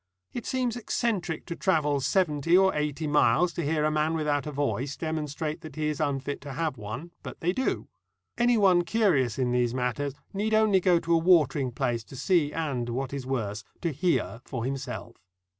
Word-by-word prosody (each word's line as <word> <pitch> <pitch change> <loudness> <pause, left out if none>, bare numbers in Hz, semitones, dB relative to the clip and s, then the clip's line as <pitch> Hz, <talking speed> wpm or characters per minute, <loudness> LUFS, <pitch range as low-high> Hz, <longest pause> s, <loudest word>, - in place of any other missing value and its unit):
It 240 - -5
seems 250 -3 0
eccentric 210 -8 -2
to 170 - -5
travel 150 -7 +1
seventy 165 0 +2
or 190 0 +4
eighty 150 +1 -2
miles 155 +3 +3
to 170 - -3
hear 150 +1 +1
a 155 - +2
man 155 +1 +1
without 150 -3 0
a - - -3
voice 140 -1 -2
demonstrate 155 0 -3
that 155 - -10
he 155 -1 -1
is 150 - -3
unfit 140 -2 -2
to 140 -1 -7
have 160 0 -1
one, 125 +10 -7
but - - -8
they 175 +2 0
do. 260 +6 -1 0.5
Anyone 210 -7 +4
curious 170 - +2
in 125 -2 +1
these 120 0 +1
matters 130 +3 -1 0.2
need 215 +2 0
only 215 -3 +4
go 180 -1 +4
to 170 0 0
a 165 - +5
watering 160 -6 +3
place 120 -2 -1
to - - -12
see 155 +1 +2
and, 140 -8 -2
what 130 +3 -3
is 135 -2 -5
worse, 110 -5 -2 0.2
to 170 - 0
hear 150 -6 0
for 120 -4 -4
himself. 135 -1 -5
150 Hz, 190 wpm, -27 LUFS, 135-175 Hz, 0.5 s, a